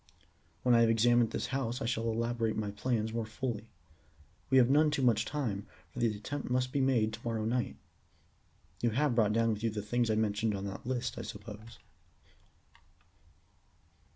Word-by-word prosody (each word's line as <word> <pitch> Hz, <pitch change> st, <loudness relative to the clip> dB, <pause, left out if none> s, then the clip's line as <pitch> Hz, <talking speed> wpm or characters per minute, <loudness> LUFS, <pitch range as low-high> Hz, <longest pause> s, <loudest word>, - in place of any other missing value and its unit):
When 125 Hz, -, +4 dB
I 115 Hz, -, +6 dB
have 115 Hz, -, +5 dB
examined 120 Hz, +1 st, +4 dB
this -, -, -3 dB
house 125 Hz, -2 st, -1 dB
I 135 Hz, -, -3 dB
shall 115 Hz, -1 st, 0 dB
elaborate 115 Hz, 0 st, -1 dB
my 105 Hz, -2 st, -2 dB
plans 110 Hz, +1 st, -1 dB
more 115 Hz, 0 st, -1 dB
fully. 115 Hz, -1 st, -4 dB, 0.8 s
We 130 Hz, -, +5 dB
have 125 Hz, -2 st, +7 dB
none 150 Hz, +3 st, +4 dB
too 145 Hz, -2 st, -1 dB
much 115 Hz, -3 st, +3 dB
time, 115 Hz, -10 st, -3 dB, 0.2 s
for -, -, -8 dB
the 120 Hz, -, +3 dB
attempt 140 Hz, +7 st, -5 dB
must 125 Hz, 0 st, +1 dB
be 140 Hz, -, +1 dB
made 120 Hz, -5 st, +2 dB
to -, -, -6 dB
morrow 115 Hz, -2 st, -2 dB
night. 120 Hz, -, -1 dB, 1.1 s
You 120 Hz, -, +3 dB
have 135 Hz, +4 st, +1 dB
brought 110 Hz, -3 st, +3 dB
down 115 Hz, 0 st, +2 dB
with 105 Hz, -, -6 dB
you 115 Hz, -, +1 dB
the 105 Hz, -1 st, -4 dB
things 120 Hz, +2 st, 0 dB
I 110 Hz, -, +2 dB
mentioned 110 Hz, 0 st, 0 dB
on 100 Hz, 0 st, -4 dB
that 100 Hz, +4 st, -6 dB
list, 125 Hz, -2 st, -2 dB
I -, -, -3 dB
suppose?" 110 Hz, +1 st, -9 dB
115 Hz, 180 wpm, -32 LUFS, 110-125 Hz, 1.1 s, have